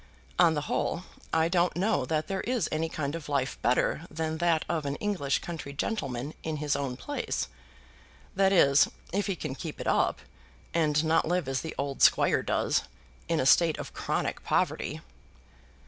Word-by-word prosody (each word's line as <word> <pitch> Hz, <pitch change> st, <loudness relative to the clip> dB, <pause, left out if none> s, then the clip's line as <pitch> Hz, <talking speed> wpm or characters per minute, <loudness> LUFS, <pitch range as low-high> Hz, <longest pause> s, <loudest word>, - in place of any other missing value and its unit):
On 170 Hz, -3 st, +6 dB
the 150 Hz, -, 0 dB
whole 170 Hz, +4 st, -1 dB, 0.3 s
I 160 Hz, 0 st, +3 dB
don't 175 Hz, 0 st, +2 dB
know 185 Hz, -6 st, +1 dB
that 155 Hz, +3 st, 0 dB
there 195 Hz, -1 st, -2 dB
is 240 Hz, -8 st, 0 dB
any 160 Hz, +1 st, -1 dB
kind 145 Hz, -3 st, -3 dB
of 165 Hz, -3 st, -6 dB
life 140 Hz, -2 st, -1 dB
better 140 Hz, +6 st, +1 dB
than 160 Hz, 0 st, -3 dB
that 170 Hz, -2 st, +2 dB
of 160 Hz, -4 st, -1 dB
an 140 Hz, -, -1 dB
English 175 Hz, -8 st, 0 dB
country 160 Hz, -5 st, -6 dB
gentleman 140 Hz, -, -3 dB
in 160 Hz, -1 st, -3 dB
his 150 Hz, 0 st, 0 dB
own 135 Hz, -3 st, -3 dB
place; 290 Hz, -, -3 dB, 0.9 s
that 195 Hz, 0 st, +4 dB
is, 140 Hz, -7 st, +6 dB, 0.3 s
if 200 Hz, +1 st, 0 dB
he 195 Hz, -, 0 dB
can 135 Hz, -, -4 dB
keep 155 Hz, +3 st, -7 dB
it -, -, -5 dB
up, -, -, +2 dB, 0.5 s
and 155 Hz, -2 st, +2 dB
not 160 Hz, 0 st, +3 dB
live 175 Hz, -3 st, 0 dB
as 135 Hz, -1 st, -1 dB
the 160 Hz, -, -6 dB
old 140 Hz, -1 st, -3 dB
squire -, -, +5 dB
does, -, -, +1 dB, 0.5 s
in 165 Hz, -1 st, +1 dB
a 130 Hz, -, +1 dB
state 165 Hz, +3 st, +5 dB
of -, -, -7 dB
chronic -, -, -2 dB
poverty." -, -, 0 dB
160 Hz, 180 wpm, -29 LUFS, 140-175 Hz, 0.9 s, On